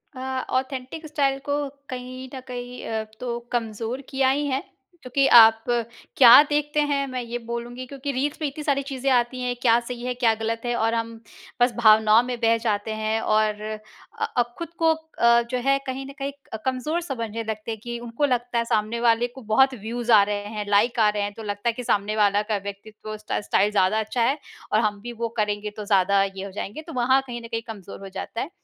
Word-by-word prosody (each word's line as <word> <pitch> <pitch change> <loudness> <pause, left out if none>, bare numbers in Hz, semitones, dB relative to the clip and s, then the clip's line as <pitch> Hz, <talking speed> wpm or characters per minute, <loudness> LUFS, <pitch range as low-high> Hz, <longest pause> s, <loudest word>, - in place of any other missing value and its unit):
अ, 260 0 -3
authentic 265 +4 -6
style 280 -3 +1
को 290 0 0 0.2
कहीं 255 0 -7
न - - -5
कहीं 245 0 -7
अ, 220 -1 -2 0.2
तो 240 -1 -3
कमज़ोर 230 +1 -3
किया 265 -2 +2
ही 290 +2 +1
हैं। 270 0 -1 0.4
क्योंकि 270 +2 +1
आप 225 -1 +8 0.5
क्या 245 0 +10
देखते 295 0 0
हैं? 285 -2 +1
मैं 255 -1 -4
ये 240 0 -4
बोलूँगी 240 +2 -5
क्योंकि 280 +1 -4
रील्स 275 +3 -1
में 305 - +1
इतनी 285 +2 -6
सारी 280 -2 +1
चीज़ें 270 -1 -2
आती 245 +1 +1
हैं। 245 0 -1
क्या 235 -1 +5
सही 240 0 -7
है, 250 - -1
क्या 240 -2 +2
गलत 225 +1 -3
है? 240 0 0
और 225 0 +1
हम 230 0 -3 0.4
बस 245 0 +4
भावनाओं 220 -1 +6
में 245 -1 -4
बह 230 0 +4
जाते 215 -1 -1
हैं 220 +1 -1
और 215 -1 +1 0.6
अ, - - +3
अब 240 0 +1
खुद 335 -2 -5
को 325 0 +4
अ, 235 -7 +2
जो 250 - 0
है 275 0 +4
कहीं 265 +1 -4
न 275 - -8
कहीं 275 +1 -2 0.2
क 220 - -4
कमज़ोर 265 +6 -1
समझने 230 -8 -4
लगते 220 0 -4
हैं। 220 - -5
कि 240 0 -4
उनको 240 +4 -1
लगता 245 -2 -1
है 235 - +1
सामने 220 +1 0
वाले 235 0 +3
को 255 +2 -13
बहुत 260 +4 +3
व्यूज़ 235 +3 -3
आ 215 - +8
रहे 205 0 -2
हैं, 210 - -3
लाइक 220 +4 +3
आ 215 - +5
रहे 210 -1 -1
हैं। 205 - -3
तो 225 - -9
लगता 205 +2 -2
है 230 - 0
कि 250 - -6
सामने 210 -2 0
वाला 205 -1 +3
का 210 - +2
व्यक्तित्व 210 +2 -9
उस 215 - -6
स्टा 215 - -2
स्टाइल 205 0 +2
ज़्यादा 205 +1 +2
अच्छा 220 +3 -2
है, 265 +6 +2 0.4
और 215 - +5
हम 210 -2 0
भी 240 +2 -7
वो 230 0 -2
करेंगे 210 0 -1
तो 210 - -5
ज़्यादा 200 0 +3
ये 195 0 -5
हो 200 - -8
जाएँगे। 205 +8 -6
तो 325 - -7
वहाँ 255 +2 +3
कहीं 240 -1 -6
न 230 - -9
कहीं 230 -1 -3
कमज़ोर 200 -4 -9
हो 195 - -9
जाता 195 +4 -5
है। 290 - -4
235 Hz, 225 wpm, -24 LUFS, 215-260 Hz, 0.6 s, क्या